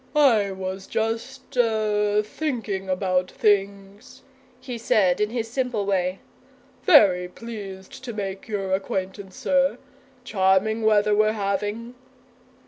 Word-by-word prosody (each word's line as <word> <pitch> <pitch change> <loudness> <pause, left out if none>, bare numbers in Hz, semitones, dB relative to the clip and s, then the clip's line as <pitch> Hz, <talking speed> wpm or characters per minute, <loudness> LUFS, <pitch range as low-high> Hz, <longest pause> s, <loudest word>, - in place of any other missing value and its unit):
"I 235 -9 +4
was 190 0 -5
just 230 +5 -3
er 210 -3 +2
thinking 215 -8 -3
about 185 -1 0
things," 200 +1 -1 0.4
he 245 -3 -7
said 205 -4 +2
in 210 - +1
his 230 -1 -3
simple 245 -3 -2
way. 185 -1 0 0.6
"Very 195 - +5
pleased 210 +3 -9
to 240 - -4
make 195 -3 -5
your 195 -3 -2
acquaintance, 190 0 -3
sir. 275 0 +1 0.5
Charming 200 0 +2
weather 210 -1 +3
we're 215 +1 +3
having!" 205 +3 -3
210 Hz, 115 wpm, -24 LUFS, 190-230 Hz, 0.6 s, Very